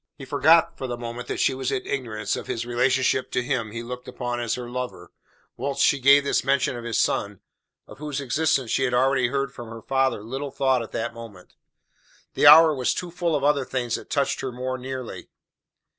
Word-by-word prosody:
He 135 - -9
forgot 160 +4 +3
for 130 - -3
the 120 -1 -4
moment 120 +1 -6
that - - -4
she - - +2
was 130 -1 -3
in - - -2
ignorance 115 -6 -3
of - - -7
his 115 - -3
relationship 130 +1 +1
to 125 - +1
him 125 -4 -2
he 115 +2 -6
looked 125 +2 -8
upon 120 -1 -4
as 120 -2 -1
her 125 -1 -6
lover, 125 +1 -6 0.5
whilst 140 +2 0
she 140 - +3
gave 140 +2 +6
this 140 - 0
mention 140 -1 +1
of 120 - -7
his 115 -2 -1
son, 100 -1 0 0.5
of - - -14
whose 150 -2 -4
existence 135 -2 0
she - - +1
had 125 -1 0
already 130 0 +3
heard 140 +1 -2
from 120 -3 -9
her; 115 -1 -9
father, 135 -5 0
little 135 +5 -5
thought 130 -2 +1
at 115 - -8
that 115 +1 -3
moment. 115 -6 -12 0.8
The - - +4
hour 155 +1 +9
was 130 -3 0
too 175 -1 -5
full 170 -2 -1
of 140 - -1
other 145 -1 +3
things 125 -2 -3
that - - -4
touched 140 -2 0
her 130 - -3
more 130 +1 -4
nearly. 130 -1 -7
130 Hz, 215 wpm, -24 LUFS, 120-140 Hz, 0.8 s, hour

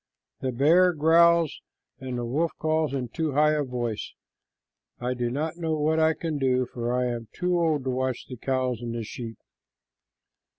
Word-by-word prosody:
The 130 - -2
bear 165 +8 +4
growls 165 +1 +4 0.4
and 130 -1 -4
the 120 - -2
wolf 155 +8 0
calls 155 -1 0
in 130 -3 -3
too 160 +1 -2
high 150 +2 +4
a 150 -1 +1
voice. 120 -4 -4 0.9
I 125 +1 -1
do 120 -1 -2
not 155 +6 -3
know 165 -2 -1
what 155 +1 +1
I 160 0 +3
can 160 -3 -3
do, 130 -1 +2
for 120 0 -4
I 125 0 +1
am 120 -2 -3
too 180 -1 0
old 155 -5 +1
to 130 - -1
watch 130 -1 -2 0.2
cows 130 -3 -1
and 115 -1 -4
sheep." 115 +1 -7
135 Hz, 170 wpm, -26 LUFS, 125-160 Hz, 0.9 s, bear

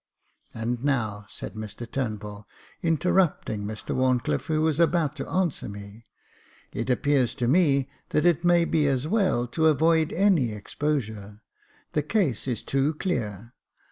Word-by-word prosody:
" - - -41
And 120 +2 -3
now," 110 -7 -1
said - - -7
Mr 110 +2 -7
Turnbull, 105 -4 -5 0.3
interrupting 165 - +1
Mr 110 +1 -5
Wharncliffe, 130 -1 +1
who 155 -1 +1
was 160 -1 +1
about 165 -3 +2
to 135 - -5
answer 185 - -1
me, 100 +2 -10 0.7
it 115 - -3
appears 130 -1 +2
to 120 - -1
me 140 -3 +3 0.2
that 155 - +1
it 170 -1 +3
may 175 -1 +4
be 155 -3 +2
as 135 +1 0
well 185 - +2
to 160 +4 +2
avoid 160 +1 +3
any 170 - +2
exposure 110 -3 -4 0.2
— - - -34
the 150 - +2
case 150 - 0
is 120 -5 -2
too 140 +3 0
clear. 115 - -3
135 Hz, 150 wpm, -26 LUFS, 110-160 Hz, 0.7 s, may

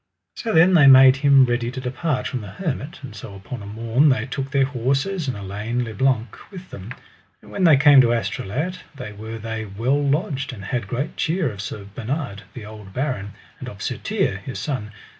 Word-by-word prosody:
So 230 - -3
then 175 +2 +5
they 150 -6 +7
made 130 -1 +9
them 140 -2 +6
ready 120 -1 -1
to 130 +1 -6
depart 130 +1 -2
from 125 - -3
the 105 - -8
hermit. 155 - -4
And 125 -5 -9
so 100 0 -9
upon 105 +4 -8
a 100 - -9
morn 115 +7 +2
they 130 -4 +1
took 135 +1 -4
their 135 -1 +2
horses 140 +7 -1
and 125 -5 -2
Elaine 105 +5 -3
le 110 -2 -6
Blank 120 -1 0
with 185 -2 -11
them; 100 +4 -9 0.5
and - - -16
when 190 - 0
they 155 -4 +7
came 145 -1 +7
to 120 -2 +3
Astolat 120 - -2 0.2
there 125 -6 -7
were 110 +2 -7
they 110 0 -5
well 115 +8 0
lodged, 140 -2 -1
and 100 -5 -9
had 120 -1 -3
great 130 +7 -3
cheer 165 -4 0
of 100 -1 -7
Sir 100 0 -6
Bernard, 125 -2 -4
the 120 -4 -8
old 105 -3 -11
baron, 125 -6 -3 0.3
and - - -6
of - - -9
Sir - - -2
Tirre, 95 - -1
his 110 +6 -7
son. 130 -8 -4
125 Hz, 210 wpm, -22 LUFS, 110-140 Hz, 0.5 s, made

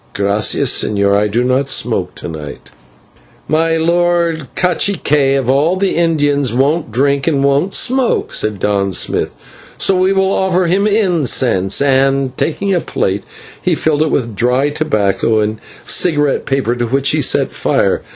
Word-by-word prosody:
"/Gracias/, 100 +1 +1
señor, 100 -1 0
I 105 +1 +2
do 115 +4 -1
not 130 +2 0
smoke 130 - -1
to - - -8
night." 75 -3 -9 0.8
"My 165 +1 +1
lord 170 -2 0
/cacique/ 150 -6 +1
of 135 -3 -2
all 145 +7 +2
the 195 0 -1
Indians 145 -6 +1
won't 145 +3 0
drink 140 +4 0
and 140 -4 +1
won't 140 +7 +1
smoke," 260 -1 0
said 110 -1 0
Don 100 -1 -1
Smith, - - -1 0.4
"so 195 - +2
we 185 +1 +2
will 190 0 +1
offer 185 -1 +1
him 195 +4 +1
incense" 145 - +1
and, 135 -1 +1
taking 195 +8 -1
a 175 - +1
plate, 95 +1 -2 0.4
he - - 0
filled 155 -1 0
it 155 - +1
with 115 -7 -2
dry 125 +6 +1
tobacco 110 -7 0
and 110 +1 -2 0.3
cigarette 145 -5 +1
paper, 135 -3 0
to 120 0 -2
which 135 +3 +1
he - - 0
set - - +1
fire. - - 0
140 Hz, 155 wpm, -14 LUFS, 115-170 Hz, 0.8 s, I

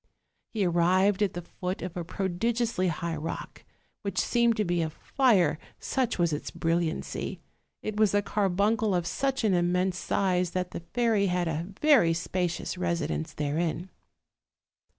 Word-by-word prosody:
He 210 -4 0
arrived 185 +4 +3
at 205 -3 +2
the 175 - -4
foot 180 +2 -5
of 180 -1 -5
a 175 - -3
prodigiously 195 +3 -1
high 170 0 -2
rock, 155 +2 -6 0.4
which 200 -2 -4
seemed 235 -1 +2
to 210 - +1
be 175 -1 +1
of 160 -1 -2
fire, 190 - +2 0.2
such 255 -3 -1
was 170 -3 +2
its 150 - -3
brilliancy; 165 0 -2 0.4
it 215 -1 -3
was 210 -2 +4
a 205 - +3
carbuncle 205 +2 +1
of 175 -1 0
such 270 +7 -1
an 210 -3 +3
immense 180 +1 +1
size 180 -2 +1
that 180 -1 -2
the - - -5
fairy 215 +3 +1
had 180 -1 0
a 165 +2 -2
very 255 - +5
spacious 180 +1 -2
residence 170 - -2
therein. 160 +4 -2
180 Hz, 150 wpm, -28 LUFS, 170-210 Hz, 0.4 s, very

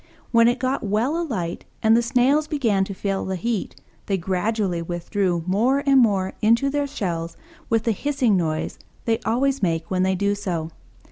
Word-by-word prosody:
When 230 -1 +5
it 240 - +2
got 260 +1 -1
well 220 +8 0
alight 185 - -3 0.2
and 220 0 +5
the 235 - +4
Snails 265 +5 +2
began 230 -11 +1
to 195 - -6
feel 195 0 -2
the 190 - -3
heat, 225 +2 -2 0.3
they 195 - +1
gradually 190 0 -1
withdrew 175 +1 -1
more 240 +10 +2
and 275 -1 +5
more 195 -6 +2
into 230 +6 +3
their 290 0 0
shells 170 - -4 0.3
with 225 -1 +2
the 230 - +1
hissing 255 -1 +1
noise 160 -3 -2 0.3
they 225 -1 +1
always 270 +4 +1
make 165 -2 -1
when 185 -1 +1
they 190 0 +2
do 200 +2 +1
so. 170 -5 -3
210 Hz, 180 wpm, -23 LUFS, 185-245 Hz, 0.3 s, When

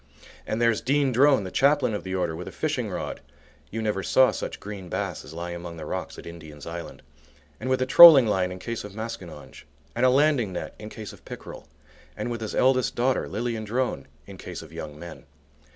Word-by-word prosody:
And 110 - -2
there's 115 -2 +2
Dean 140 +1 +2
Drone, 135 -1 +4
the 95 - -6
Chaplain 140 -4 +3
of 105 - -4
the 95 0 -4
Order, 90 -3 -1
with 90 +2 -7
a - - -6
fishing - - -2
rod - - -5 0.5
(you 110 +1 -4
never 105 -3 -1
saw 130 +6 +4
such - - -5
green 100 -3 -8
bass 95 0 -3
as - - -12
lie 85 +2 -6
among 85 -1 -7
the 80 - -7
rocks - - -5
at - - -10
Indian's 80 -4 -10
Island), 85 +1 -8 0.6
and 130 - -4
with 130 0 +2
a - - -1
trolling 150 -1 +10
line 95 -4 0
in 90 - -6
case 115 +4 -5
of 105 -1 -10
maskinonge, 95 -11 -8 0.3
and 120 - -1
a 130 - +6
landing 135 -6 +2
net - - -5
in 105 0 -8
case 110 -1 -8
of - - -17
pickerel, - - -10 0.5
and 120 - -3
with 115 -1 -4
his 110 - -4
eldest 130 -1 +2
daughter, 125 +2 +1
Lilian 115 -2 -3
Drone, 110 - -2 0.2
in 95 -2 -12
case 90 -2 -7
of 80 0 -14
young 75 -2 -7
men. 80 -3 -11
105 Hz, 215 wpm, -25 LUFS, 85-125 Hz, 0.6 s, trolling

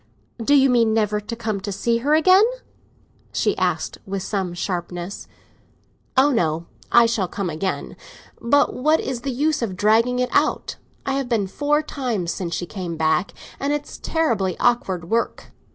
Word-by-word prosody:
"Do 285 +6 +4
you 270 -1 +6
mean 230 -3 +3
never 210 -1 +1
to 220 +3 -6
come 220 -3 -3
to 200 +1 -4
see 230 +4 0
her 290 +5 +2
again?" 370 +5 +6 0.9
she - - +1
asked, - - -1
with 195 -1 -3
some 190 -3 -2
sharpness. 175 +1 -4 0.9
"Oh 275 +3 +5
no, 165 - 0 0.3
I 235 -1 +7
shall 225 -5 0
come 185 -1 -3
again; 185 +5 -3 0.5
but 285 +5 +3
what 305 +5 +2
is 255 -3 -3
the 275 - -3
use 295 +4 0
of 210 -6 -2
dragging 225 +5 +3
it 250 0 0
out? - - +1 0.3
I 270 - 0
have 270 -2 -2
been 225 -5 +1
four 295 +9 0
times 235 - -2
since 170 -4 -3
she 175 - -3
came 170 0 -5
back, 160 +3 +1 0.3
and 280 +1 0
it's 295 0 -5
terribly 225 - 0
awkward 190 -8 +1
work. 230 +4 -2
225 Hz, 170 wpm, -22 LUFS, 190-265 Hz, 0.9 s, I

